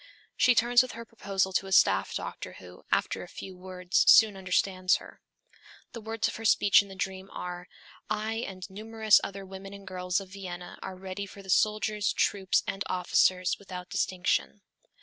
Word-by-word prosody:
She 250 - +4
turns 240 +1 +5
with 255 - -5
her 230 0 -8
proposal 195 -4 -2
to 195 - 0
a - - -8
staff - - +4
doctor - - -6
who, - - -13
after - - 0
a - - -8
few 190 -1 -9
words, 180 0 0
soon 215 -2 +7
understands 185 0 +1
her. - - -10 0.7
The 230 - -8
words 225 0 -1
of - - -5
her 225 - -8
speech 205 -2 +5
in 200 - -11
the 195 - -11
dream 190 0 -4
are, 180 0 -6 0.4
'I 215 +1 -1
and 185 -1 -8
numerous 215 +2 +2
other 195 0 -6
women 195 +1 -9
and 200 0 -12
girls 180 -1 -1
of 195 -1 -10
Vienna 180 -2 -8
are 190 - -6
ready 190 +2 -6
for 200 +1 -12
the 190 - -4
soldiers, 215 0 +1
troops, 195 -2 +1
and 195 0 -3
officers, 180 0 +2
without 180 -2 -9
distinction....' 185 +2 -1
195 Hz, 180 wpm, -28 LUFS, 185-210 Hz, 0.7 s, soon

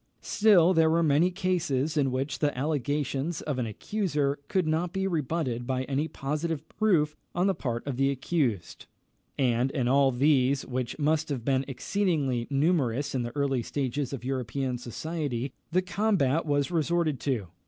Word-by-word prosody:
Still 190 -5 +5
there 160 -2 +4
were 165 +1 +3
many 155 +3 +4
cases 165 -6 -1
in 140 -3 +2
which 135 +3 -2
the 145 -3 0
allegations 145 +2 -1
of 145 -4 -3
an 120 - -1
accuser 145 - -1
could 185 -3 +1
not 165 +3 0
be 190 0 -1
rebutted 150 -8 -1
by 130 0 0
any 140 +4 -1
positive 155 +2 -3
proof 160 -9 +1 0.2
on 175 +2 +2
the 195 - +3
part 120 -8 -3
of 140 -3 -3
the 135 +1 +3
accused; 135 - -2 0.5
and 125 -1 +2
in 130 -3 -1
all 135 +1 +4
these, 135 +1 +2
which 125 -1 -3
must 155 +1 +1
have 130 -5 -3
been 135 -1 +1
exceedingly 140 -5 -1
numerous 140 -3 +1
in 130 - 0
the 120 +1 -5
early 140 -3 +1
stages 135 +1 -2
of 130 -3 -6
European 130 0 -2
society, 130 +1 -4 0.2
the 185 +3 +2
combat 175 -6 +1
was 145 0 +1
resorted 165 -3 +1
to. 120 -10 -2
145 Hz, 165 wpm, -28 LUFS, 130-165 Hz, 0.5 s, Still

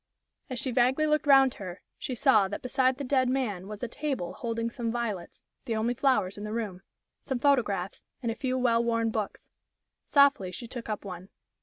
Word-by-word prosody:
As 255 - -4
she 260 - -1
vaguely 255 +5 +3
looked 300 -1 +1
round 270 -2 +7
her, 185 -2 -8 0.2
she 255 - -4
saw 215 -3 +4
that 205 - -6
beside 255 0 +2
the 285 - -4
dead 260 -1 +2
man 215 -8 -1
was 210 +2 -7
a - - 0
table 265 - -3
holding 230 -1 -3
some 230 -1 -3
violets 220 -7 -4 0.2
the 230 - -1
only 225 +3 +1
flowers 210 -8 +1
in - - -6
the 210 - -4
room 210 -5 -3 0.4
some 265 - -2
photographs, 230 -9 +1 0.2
and 230 - 0
a - - -4
few 255 0 -1
well 235 -2 +3
worn 230 -1 +1
books. 215 -2 -4 0.6
Softly 280 -10 +4
she 235 +6 -7
took 240 -1 -7
up 210 -1 -3
one. 185 0 -8
235 Hz, 195 wpm, -28 LUFS, 210-260 Hz, 0.6 s, round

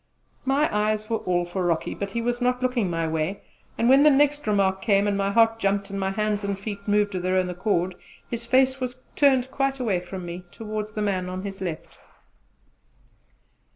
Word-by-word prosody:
My 275 +3 +3
eyes 215 +1 0
were 225 - +2
all 175 -3 0
for 180 +2 -3
Rocky, 170 -2 0
but 200 - -4
he 230 +4 -3
was 240 +1 -1
not 250 +1 +1
looking 245 -6 +1
my 165 -1 -1
way, 160 +5 -2 0.3
and 230 - +2
when 270 +2 +7
the 300 - +7
next 290 -1 +2
remark 195 -2 +2
came, 200 -2 +3
and 205 - +1
my 195 0 0
heart 225 +2 +3
jumped 200 -1 0
and 200 - -3
my 190 0 0
hands 210 +1 -1
and 200 -1 -2
feet 200 0 -7
moved 205 0 +2
of 185 - -2
their 185 +1 0
own 185 -1 +1
accord, 180 0 0 0.3
his 235 -1 -4
face 260 +2 +3
was 250 0 -3 0.2
turned 265 -3 +3
quite 275 0 -1
away 210 -8 +1
from 180 +1 -7
me 175 +1 -6
towards 215 -1 -5
the 210 - -2
man 185 -3 -1
on 185 +1 -5
his 195 -1 -6
left. 170 -4 -6
205 Hz, 205 wpm, -25 LUFS, 190-240 Hz, 0.3 s, when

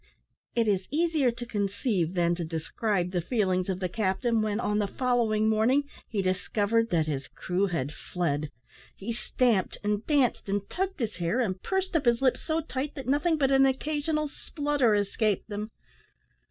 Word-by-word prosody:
It 230 -2 +2
is 195 -2 +1
easier 315 -3 +2
to 240 +1 -5
conceive 200 - -1
than 170 -1 +3
to 175 0 -3
describe 175 +4 -1
the 180 -2 0
feelings 185 -3 0
of 185 -1 -1
the 185 - -1
captain, 220 +4 0
when, 215 0 0
on 210 -2 0
the 205 - +1
following 230 -2 +1
morning, 225 +6 +3 0.3
he 205 -3 -1
discovered 205 +4 +1
that 165 -6 +2
his 140 -3 -3
crew 190 +2 -1
had 150 -6 -2
fled. 155 -4 -2 0.5
He 200 +4 -5
stamped, 230 -3 +1
and 210 0 0
danced, 275 -9 +2
and 200 0 -1
tugged 380 -2 -2
his 220 -7 -2
hair, 175 +8 0
and 190 -6 -1
pursed 380 -2 -1
up 305 - +2
his 235 -1 +4
lips 260 -2 +2
so 320 0 0
tight 290 -2 -4
that 270 -3 -7
nothing 295 +4 +2
but 275 -2 +2
an 270 0 +6
occasional 305 +3 0
splutter 290 -6 0
escaped 205 0 0
them! 210 +1 -4
220 Hz, 175 wpm, -28 LUFS, 190-265 Hz, 0.5 s, an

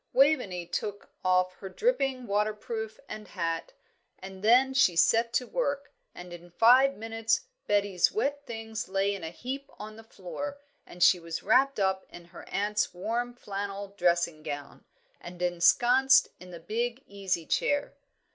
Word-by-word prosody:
Waveney 255 - +2
took 205 +4 -5
off 185 0 +2
her 195 - -8
dripping 270 - 0
waterproof 215 +1 -2
and 215 -1 -8
hat, 170 - -3 0.4
and 190 0 -10
then 255 +4 +5
she 260 -10 +4
set 230 +7 +3
to 250 - +1
work, 285 - -2 0.2
and 180 0 -10
in 175 0 -11
five 250 +9 +5
minutes 225 - -1 0.3
Betty's 200 -3 +2
wet 285 -9 -1
things 225 -2 -6
lay 195 +1 +1
in 195 -4 -7
a 160 - -4
heap 260 +10 -6
on 215 +1 -9
the 225 - -12
floor, 255 +8 -7 0.3
and 175 0 -2
she 180 0 +6
was 165 -1 -6
wrapped 260 +4 +3
up 190 -1 0
in 175 - -12
her - - -11
aunt's 210 -1 -1
warm 240 +6 -3
flannel 200 -2 -5
dressing 170 -4 0
gown, 145 -2 -7 0.3
and 175 0 -10
ensconced 240 +10 +4
in 180 - -12
the 175 -1 -9
big 235 +8 -3
easy 195 -4 -3
chair. 285 - 0
210 Hz, 155 wpm, -28 LUFS, 180-245 Hz, 0.4 s, she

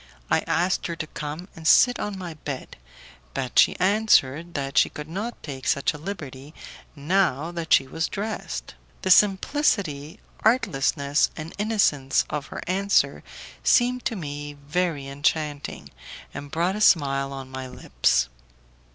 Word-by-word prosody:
I - - +5
asked 180 +2 +1
her 170 - -4
to 155 - -4
come 155 +3 -6
and 160 -1 -5
sit 245 -1 +6
on 205 -2 -3
my 180 -3 -6
bed, 145 -3 -7 0.6
but 130 - 0
she - - +5
answered 175 -6 +2
that 135 -2 -3
she - - +5
could 150 0 -8
not 205 +9 -5
take 135 -3 -6
such 140 - +2
a 150 - -9
liberty 150 -5 -7 0.4
now 160 0 +1
that 170 -2 -6
she 135 - +6
was 160 +5 -2
dressed, 210 +3 -5 0.3
The 185 - +2
simplicity, 190 - +2 0.2
artlessness, 145 - +2
and 160 +1 -7
innocence 200 -11 +2
of 150 -1 -4
the - - -7
answer 195 +2 +1 0.4
seemed 250 0 +3
to 230 - -1
me 145 -4 -6
very 160 -3 -1
enchanting, 145 +1 -2 0.4
and 145 0 -7
brought 175 +5 0
a 210 - -4
smile 140 -8 +3
on 135 -1 -8
my 130 0 -6
lips. - - +1
155 Hz, 145 wpm, -25 LUFS, 140-190 Hz, 0.6 s, sit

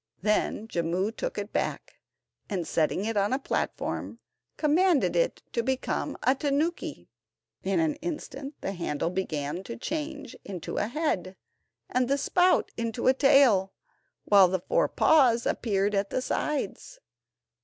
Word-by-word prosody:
Then 215 +1 0
Jimmu 175 +2 -1
took - - -4
it 205 +1 -5
back, - - -3 0.5
and 185 -6 -2
setting 165 +5 0
it 225 0 -2
on 200 0 +2
the 260 - +1
platform, 275 - -3 0.4
commanded 325 +1 +3
it - - 0
to 235 - +1
become 260 +2 -2
a 260 - +4
tanuki. 290 +5 -2 0.5
In - - 0
an 320 -2 +2
instant 295 -3 -6
the - - -2
handle 170 -3 -2
began 165 -2 -3
to 235 - -6
change 295 -1 -5
into 185 -4 -6
a 205 - +1
head, 230 - -2 0.5
and 255 0 +1
the 275 +2 +2
spout 360 +5 +2
into 230 0 -3
a 260 - +6
tail, 255 -8 +4 0.5
while 200 -2 +7
the 185 0 -1
four - - +2
paws 250 -7 +4
appeared 205 -2 0
at 195 0 0
the 255 - -2
sides. 285 -8 -3
235 Hz, 145 wpm, -27 LUFS, 195-290 Hz, 0.5 s, while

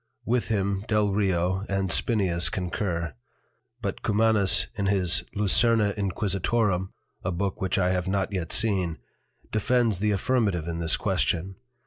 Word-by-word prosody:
With 120 +1 0
him 100 -2 -1
Delrio, 95 -3 +1
and 95 -2 -1
Spineus 95 -7 +1
concur. 90 -3 -3 0.7
But - - -3
Cumanus 105 -2 +4
in 100 -1 -2
his 95 -4 +2
Lucerna 105 +1 +3
Inquisitorum 100 0 0 0.3
(a 90 - -1
Book 95 +2 -3
which 95 +1 0
I 90 -1 +2
have 90 0 -1
not 100 +1 -1
yet 85 -4 -3
seen) 95 -7 +1 0.5
defends 110 -2 +1
the 105 +1 +1
Affirmative 100 -5 0
in 85 0 -3
this 80 -1 +2
Question. 90 +3 -1
95 Hz, 130 wpm, -26 LUFS, 90-105 Hz, 0.7 s, Cumanus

